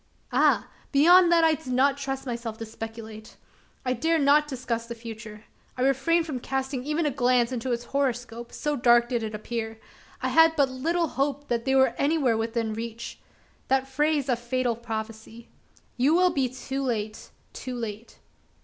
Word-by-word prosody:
Ah! - - +3 0.2
beyond 345 +5 +6
that 335 -1 +5
I 320 -1 +5
did 285 -5 -5
not 270 +2 +3
trust 270 -1 -4
myself 235 -3 -4
to 225 - -6
speculate. 220 0 -9 0.5
I 255 - +1
dared 320 +5 +1
not 295 +2 +5
discuss 240 -4 -3
the 235 - -6
future. 220 -2 -9 0.3
I 250 - 0
refrained 295 +6 +2
from 285 -6 -4
casting 265 0 -3
even 305 +3 -1
a 295 - +1
glance 245 -2 +2
into 255 0 -3
its 240 0 -1
horoscope 245 -3 -2
so 295 0 -2
dark 240 -2 +4
did 240 -2 0
it 220 -1 -4
appear. 220 +1 -5 0.4
I - - -1
had 325 0 +5
but 280 -3 +3
little 330 +7 0
hope 280 +2 -2
that 235 -1 -1
they 265 0 +2
were 265 0 +4
anywhere 280 -5 +2
within 225 0 -1
reach. 230 +1 -6 0.5
That 265 0 +1
phrase 295 +1 +1
of 245 -3 +1
fatal 240 0 -1
prophecy, 225 0 -7 0.5
"You 275 +6 +3
will 365 0 +4
be 265 -3 0
too 265 +2 -5
late 220 -5 -3 0.2
too 255 -1 -6
late!" 225 -1 -6
255 Hz, 175 wpm, -26 LUFS, 230-280 Hz, 0.5 s, beyond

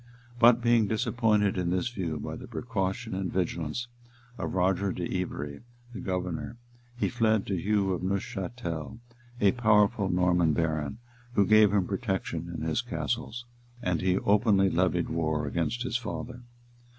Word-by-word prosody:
[*] 120 0 -21
But 120 0 +6
being 120 -3 +4
disappointed 110 -3 +1
in 90 -1 0
this 95 +6 0
view 85 -10 -3
by - - -5
the 125 +1 -9
precaution 115 -1 -3
and 95 -1 -2
vigilance 85 +4 -2 0.5
of 90 -4 -4
Roger 95 +1 +2
de 90 - -4 0.2
Ivery, 75 -5 -5 0.3
the 105 - -6
governor, 90 +4 -3 0.4
he - - +1
fled 110 -3 +1
to 100 - -1
Hugh 95 +1 +1
de - - -9
Neufchatel, 95 -2 -3 0.4
a 100 -2 +5
powerful 105 -3 +3
Norman 90 -2 +3
baron, 80 -2 -1 0.4
who 100 - +4
gave 110 0 +6
him 100 -3 +2
protection 95 -5 -3
in 80 -2 -5
his 80 +8 +1
castles; 120 -1 -3 0.3
and 90 -6 -1
he 95 0 +2
openly 100 -2 +3
levied 90 0 +1
war 80 -2 -1
against 85 - -1
his 120 -1 0
father. 120 +1 -6
95 Hz, 150 wpm, -28 LUFS, 90-115 Hz, 0.5 s, But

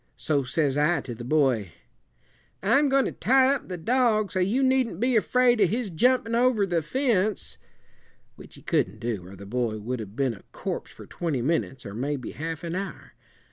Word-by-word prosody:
So 140 +3 0
says 140 +1 0
I 160 +4 +2
to 120 - -7
the 120 +1 -8
boy, 125 - +1 0.9
'I'm 275 +8 +4
goin' 270 0 +3
to - - -2
tie 265 +2 +3
up 280 - -4
the 180 - -5
dog, 220 +2 +2
so 185 - -1
you 210 +9 +1
needn't 260 -8 +1
be 250 +2 +2
afraid 245 +1 +3
of 190 - +5
his 225 -2 -2
jumpin' 235 +5 +2
over 235 -3 +3
the 175 -3 0
fence' 195 - -1 0.8
which - - -13
he - - -14
couldn't 105 +3 0
do, 110 -6 -4
or 95 - -11
the 100 - -11
boy 115 0 -2
would 120 +4 -4
have 105 -1 -8
been 135 -2 0
a 100 - -13
corpse - - -5
for - - -12
twenty 155 -8 -3
minutes, 135 -3 -1
or 100 - -7
maybe 130 +2 -3
half 160 +1 -5
an 170 -1 -4
hour. 190 -3 -6
170 Hz, 195 wpm, -26 LUFS, -, 0.9 s, of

